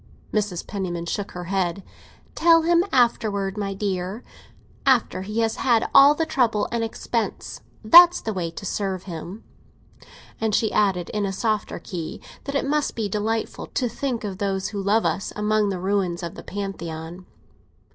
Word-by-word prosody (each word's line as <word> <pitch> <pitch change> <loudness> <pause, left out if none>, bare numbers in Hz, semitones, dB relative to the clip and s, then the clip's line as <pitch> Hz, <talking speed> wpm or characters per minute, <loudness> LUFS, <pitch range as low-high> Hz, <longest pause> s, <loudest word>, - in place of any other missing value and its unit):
Mrs. 205 -5 -1
Penniman 175 -4 -4
shook 200 +4 -4
her 180 - -6
head. 185 0 -1 0.5
"Tell 330 -1 +5
him 340 +1 +4
afterwards, 215 -6 +1
my 200 -2 -3
dear! 195 +2 -3 0.6
After 255 -8 +2
he 210 +4 -2
has 225 -1 0
had 235 -3 +2
all 280 +1 +8
the 325 - 0
trouble 230 -8 +1
and 235 -1 -1
the 225 - 0
expense! 230 0 -4 0.2
That's 345 +10 +8
the 220 - -4
way 175 -3 -2
to 165 +4 -9
serve 190 -1 -2
him." 175 +4 -8 1.0
And 220 -2 +1
she 220 - +1
added, 190 -4 +1
in 210 -1 -1
a - - -2
softer 215 +2 -1
key, 170 -5 -6 0.3
that 280 - -4
it 280 - +1
must 295 +1 0
be 220 -3 -2
delightful 215 +2 -2
to 250 - -1
think 245 -1 -3
of 195 -3 -5
those 195 -1 -1
who 205 -2 -4
love 210 +3 +2
us 195 - -1
among 210 0 +1
the 190 - -2
ruins 185 -2 -1
of 170 - -5
the - - -9
Pantheon. 175 -3 -6
205 Hz, 170 wpm, -23 LUFS, 190-225 Hz, 1.0 s, all